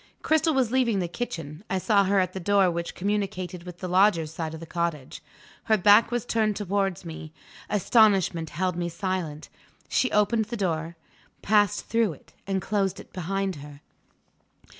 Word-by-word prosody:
Cristel 315 0 +2
was 255 -4 +1
leaving 250 -5 +2
the 180 -2 -1
kitchen; 165 -5 -6
I 190 - 0
saw 200 +1 +3
her 195 +1 +3
at 185 -1 0
the 190 - -4
door 195 0 +3
which 170 0 -4
communicated 195 -2 -2
with 180 -1 -9
the 185 - -3
Lodger's 180 -4 +3
side 160 -1 -4
of - - -9
the 165 - -8
cottage. 165 -5 -3 0.4
Her 220 - +3
back 205 +3 +6
was 240 -2 -2
turned 215 -3 +1
towards 195 -3 -1
me; 160 -1 -8 0.4
astonishment 195 -6 +3
held 185 0 -2
me 175 0 -2
silent. 170 -4 -4 0.4
She 255 - +2
opened 215 +2 +2
the 235 +3 -5
door, 165 -4 -2 0.5
passed 205 -1 +2
through 225 -6 +1
it, 140 - -19
and 190 -2 -1
closed 195 -2 -1
it - - -14
behind 190 0 -2
her. 145 0 -11
190 Hz, 170 wpm, -26 LUFS, 170-210 Hz, 0.5 s, back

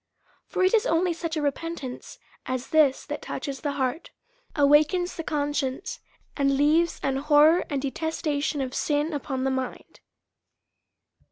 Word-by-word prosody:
For 370 - -1
it 370 - +3
is 455 +2 +3
only 345 -1 +2
such 330 -1 -4
a 300 - -1
repentance 285 -2 -4 0.3
as 255 0 -3
this, 300 -4 +3
that - - -5
touches 275 -2 -5
tlie 290 -2 -2
heart, 265 +3 -2 0.5
awakens 300 +5 +3
the 330 - -4
conscience, 290 +2 -2 0.4
and 275 -1 +2
leaves 315 +4 +3
an 270 -1 0
horror 300 +4 +5
and 280 - -1
de 275 - -1
testation 300 -3 -2
of 255 - -8
sin 295 +3 0
upon 270 -2 -3
the 270 - +1
mind. 260 -1 -5
295 Hz, 150 wpm, -26 LUFS, 275-325 Hz, 0.5 s, horror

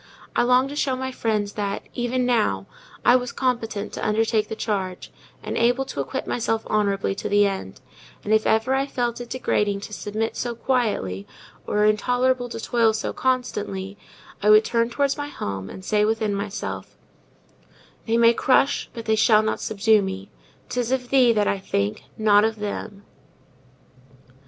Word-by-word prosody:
I - - +4
longed 250 +2 +3
to 290 - -6
show 275 -3 0
my 260 0 -4
friends 210 -4 -1
that, 200 -1 -3
even 250 +1 -1
now, 215 - +1 0.4
I 245 - +7
was 250 -1 0
competent 230 -5 -2
to - - -5
undertake 220 0 +1
the - - -5
charge, 195 -5 -3 0.3
and - - -4
able 245 +3 +2
to 140 - -4
acquit 135 - -4
myself 225 -1 -1
honourably 200 -2 0
to 195 - -5
the 205 0 +4
end; 160 - -4 0.4
and 210 - 0
if 220 0 +3
ever 225 +4 +2
I 270 +1 +1
felt 240 -3 -2
it 240 - -8
degrading 205 -5 0
to 210 - -8
submit 215 +2 -3
so 240 -1 -3
quietly, 215 - -1 0.4
or 210 0 +2
intolerable 245 +3 +1
to 230 - -6
toil 225 -1 +2
so 220 - -3
constantly, 205 -7 -2 0.5
I 210 - +3
would 215 +1 +7
turn 230 0 +1
towards 280 +3 0
my 290 0 -3
home, 95 - -5
and 190 - -10
say 210 +1 +2
within 215 -1 0
myself— 200 0 -5 1.1
They 225 +1 +2
may 235 0 +6
crush, 265 +3 +2
but 230 -1 -6
they 220 - +2
shall 215 0 +5
not 220 - -1
subdue 215 0 +3
me! 190 0 -5 0.4
'Tis 245 -1 -2
of 255 -2 -1
thee 255 -3 +5
that 210 -2 +1
I 200 - 0
think, 100 - -2
not 210 -1 +5
of 220 0 +1
them. 205 -1 -6
220 Hz, 170 wpm, -23 LUFS, 205-245 Hz, 1.1 s, I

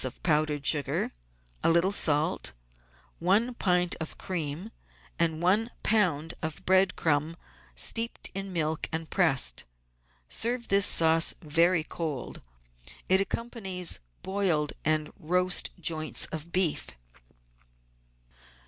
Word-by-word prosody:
of 130 -1 -6
powdered 150 -3 +1
sugar, 145 -3 +1 0.5
a - - +4
little 170 +3 +2
salt, 155 - +1 0.7
one 205 +8 +1
pint 180 -5 +1
of 160 - -6
cream, 175 +3 -5 0.5
and 165 -1 0
one 210 +6 +2
lb. 170 -7 +1
of 160 -1 -5
bread 190 0 +3
crumb 155 +1 -1 0.4
steeped 230 0 +2
in 195 0 -5
milk 160 -2 -2
and 160 0 -4
pressed. 135 - +3 0.6
Serve 235 - -1
this 200 0 +5
sauce 165 0 +3
very 165 +2 +2
cold. 155 -5 -6 0.7
It 190 +1 +5
accompanies 195 -5 -3 0.2
boiled 190 -6 -1
and 155 0 0
roast 180 +2 +2
joints 155 -1 +3
of 160 +2 -7
beef. 180 -4 +1
170 Hz, 110 wpm, -27 LUFS, 155-190 Hz, 0.7 s, this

